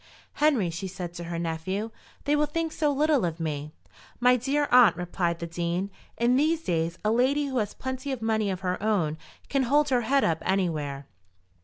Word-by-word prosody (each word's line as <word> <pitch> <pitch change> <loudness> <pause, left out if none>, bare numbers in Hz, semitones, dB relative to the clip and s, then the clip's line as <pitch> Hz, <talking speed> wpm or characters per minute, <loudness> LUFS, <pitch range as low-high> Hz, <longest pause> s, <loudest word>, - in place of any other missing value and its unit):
"Henry," 270 - +2
she 170 +4 -5
said 180 -2 -6
to 175 0 -7
her 170 0 -4
nephew, 170 +6 -3 0.3
"they 290 +1 +2
will 300 0 +2
think 325 +1 -2
so 300 -2 +1
little 295 -2 +2
of 170 -1 -2
me." 150 -2 -3 0.5
"My 250 +1 +5
dear 280 +4 0
aunt," 245 -7 +7
replied 175 -1 -1
the 170 - -5
Dean, 170 +3 -2 0.3
"in 240 +2 +3
these 320 +3 +2
days 165 - -1
a 215 - +3
lady 265 +5 +2
who 265 -3 -1
has 210 -2 -2
plenty 260 +1 -4
of 260 - -3
money 220 -2 0
of 185 -1 -3
her 180 0 -2
own 195 -8 +1 0.3
can 275 - +1
hold 290 +4 +3
her 250 -2 +2
head 270 +4 +2
up 165 -1 +1
anywhere. 155 -7 -1
215 Hz, 195 wpm, -27 LUFS, 170-270 Hz, 0.5 s, aunt